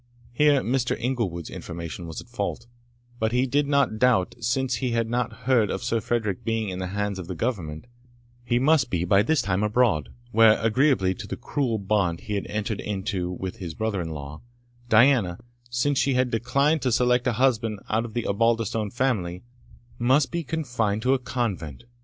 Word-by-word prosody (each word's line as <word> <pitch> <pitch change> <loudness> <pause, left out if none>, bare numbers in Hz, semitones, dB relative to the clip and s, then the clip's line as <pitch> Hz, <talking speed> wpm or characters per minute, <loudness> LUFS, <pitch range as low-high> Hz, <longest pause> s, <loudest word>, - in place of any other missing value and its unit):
Here 145 +1 +4
Mr. 125 +1 0
Inglewood's 110 -10 -2
information 85 +1 -7
was 80 - -6
at - - -16
fault; 120 0 -4 0.5
but 110 0 +1
he 125 +2 +2
did 140 +2 +1
not 140 -6 +2
doubt, 120 -4 +3
since 130 +3 -1
we 125 -3 0
had 115 -1 +1
not 120 +2 -2
heard 120 -6 +3
of - - -3
Sir 115 -2 0
Frederick 105 -3 -1
being 115 -2 -1
in 90 0 -5
the 95 - -3
hands 100 0 -2
of 90 - -7
the 90 - -5
Government, 80 -4 -3 0.6
he 120 0 +1
must 135 0 +3
be 90 -3 -1
by 100 +3 +4
this 155 +8 +1
time 95 0 0
abroad, 105 -7 +2 0.2
where, 110 0 +6
agreeably 110 -4 +2
to - - -9
the - - -4
cruel 125 -6 -1
bond 95 -4 0
he 105 - -5
had 100 - -2
entered 105 0 -3
into 95 -3 -3
with 90 +1 -5
his 85 -5 -6
brother 110 -4 -1
in 85 - -4
law, 75 -1 -7 0.5
Diana, 115 -6 +4 0.3
since 135 +4 +1
she 135 -2 +2
had 125 -1 +1
declined 140 +7 +1
to 130 - 0
select 125 +1 +2
a 125 - +2
husband 115 -3 +1
out 110 +1 +1
of 115 -1 -8
the 120 - -1
Osbaldistone 115 0 +1
family, 100 -8 -1 0.6
must 130 +4 +3
be 170 -1 -2
confined 120 -8 -1
to 130 +1 +3
a 135 - +1
convent. 105 - -3
115 Hz, 190 wpm, -25 LUFS, 95-125 Hz, 0.6 s, where